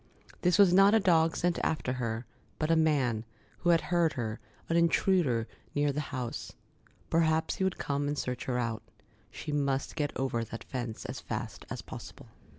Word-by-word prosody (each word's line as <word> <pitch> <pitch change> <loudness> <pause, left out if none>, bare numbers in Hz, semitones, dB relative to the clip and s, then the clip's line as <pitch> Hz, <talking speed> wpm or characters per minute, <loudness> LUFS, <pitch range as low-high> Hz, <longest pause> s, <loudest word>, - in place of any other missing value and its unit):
This 180 -1 +3
was 195 -4 +6
not 195 +3 +7
a - - +6
dog 165 -4 +3
sent 175 -1 +1
after 140 -5 0
her, 115 -2 -3 0.3
but 155 +1 0
a - - +5
man, 140 -9 +2 0.4
who 175 - +1
had 170 -1 +5
heard 170 -3 +2
her, 115 -2 -3 0.3
an 165 - 0
intruder, 170 - +3 0.3
near 145 0 +2
the 150 +2 -2
house. 125 -4 -4 0.6
Perhaps 160 -1 +2
he - - 0
would 190 -1 0
come 145 0 -1
and 145 0 -1
search 125 -2 -3
her 125 -1 -1
out. 115 -2 -1 0.5
She - - -6
must 140 -2 0
get 145 -1 -1
over 130 -3 -1
that 115 0 -7
fence 120 -4 -5
as - - -5
fast - - -5
as - - -5
possible. - - -10
145 Hz, 180 wpm, -30 LUFS, 125-170 Hz, 0.6 s, not